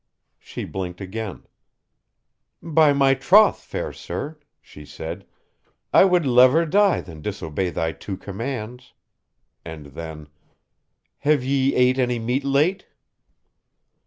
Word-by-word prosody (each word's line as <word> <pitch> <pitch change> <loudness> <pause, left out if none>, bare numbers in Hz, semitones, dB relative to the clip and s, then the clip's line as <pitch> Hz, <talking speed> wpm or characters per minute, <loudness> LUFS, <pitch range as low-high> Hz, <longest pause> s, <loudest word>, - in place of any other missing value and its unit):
She - - -7
blinked 90 -2 -6
again. 100 +1 -6 1.2
"By 160 -2 +4
my 135 -1 +3
troth, 195 +10 +5
fair - - -5
sir," 145 - -6 0.2
she 75 - -14
said, 85 +5 -8 0.7
"I - - +7
would 180 -4 +2
lever 130 +6 +5
die 200 +3 +3
than 80 -4 -12
disobey 80 +4 -3
thy 80 -1 -2
two 95 +3 -7
commands." 120 +4 -6 0.7
And 80 -2 -9
then, 80 -1 -8 0.9
"Have 145 -2 +2
ye 135 +1 +1
ate 125 +1 +3
any 125 -1 +1
meat 125 +4 -2
late?" 145 +8 +1
125 Hz, 115 wpm, -22 LUFS, 90-145 Hz, 1.2 s, I